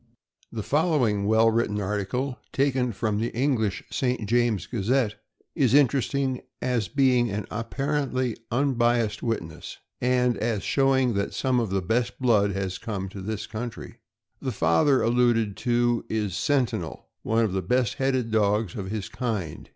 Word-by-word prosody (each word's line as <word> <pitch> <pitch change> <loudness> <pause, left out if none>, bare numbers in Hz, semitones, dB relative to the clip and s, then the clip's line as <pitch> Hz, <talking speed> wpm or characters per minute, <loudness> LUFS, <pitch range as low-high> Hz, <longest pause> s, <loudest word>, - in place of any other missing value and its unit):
The 110 -2 -4
following 140 - +1
well 110 +1 +4
written 110 -2 0
article, 105 +7 -2
taken 130 -3 +1
from 105 0 -1
the 115 +2 -1
English 120 -6 0
St. 125 -5 -1
James 120 -4 +1
Gazette, 115 0 0 0.4
is 130 -2 +3
interesting 135 -1 +2 0.2
as 125 -4 0
being 130 -4 +3
by 100 - -4
an 105 -2 -3
apparently 130 +1 -1
unbiased 120 -4 +1
witness, 85 -10 -4 0.2
and 125 -1 +2
as 110 -2 -1
showing 135 -3 +2
that 100 0 -2
some 130 -2 +1
of 115 -4 -1
the 95 0 -1
best 120 +5 0
blood 105 -6 +3
has 95 -1 -3
come 100 -5 -4
to 95 0 -8
this 110 +2 -4
country. 115 +1 -7 0.4
The 130 - -2
father 85 - +3
alluded 115 -3 +2
to 120 -1 +1
is 105 -3 -1
Sentinel, 135 -4 -1
one 115 +1 +2
of 100 - -2
the 95 - 0
best 125 +4 +1
headed 130 -4 0
dogs 105 -2 +1
of 95 -2 -5
his 105 -2 -3
kind. 105 - -4
115 Hz, 150 wpm, -26 LUFS, 105-130 Hz, 0.4 s, well